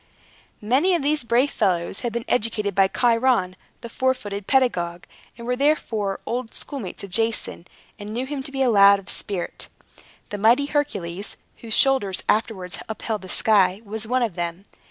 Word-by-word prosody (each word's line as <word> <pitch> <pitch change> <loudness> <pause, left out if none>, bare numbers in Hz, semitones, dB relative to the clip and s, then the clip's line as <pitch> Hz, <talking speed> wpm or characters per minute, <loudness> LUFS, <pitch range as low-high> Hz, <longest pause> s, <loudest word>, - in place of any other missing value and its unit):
Many 280 - +3
of 335 - -1
these 295 -1 +1
brave 240 +4 +2
fellows 185 -2 0
had 240 - -3
been 235 +1 -4
educated 210 -3 0
by 195 +1 +4
Chiron, 230 -4 +2 0.3
the 235 - -7
four 260 +3 +1
footed 205 -4 -7
pedagogue, 180 -10 +1 0.3
and 235 - -9
were 250 +1 0
therefore 230 -8 0
old 240 -1 -4
schoolmates 255 -12 -4
of 195 - -8
Jason, 225 -4 -1 0.3
and 205 +1 -7
knew 245 +4 -2
him 280 0 -4
to 270 - -9
be 270 -1 0
a 250 - +3
lad 200 -1 +7
of 195 -2 -12
spirit. 190 -4 -4 0.6
The 205 - -4
mighty 235 +7 +4
Hercules, 205 - -3 0.2
whose 225 -2 -3
shoulders 260 -9 +3
afterwards 200 -4 -1
upheld 220 0 -3
the 185 - -10
sky, 195 -3 +3
was 220 +1 -6
one 250 +1 +1
of 225 -6 -1
them. 175 +2 -4
220 Hz, 175 wpm, -23 LUFS, 195-255 Hz, 0.6 s, lad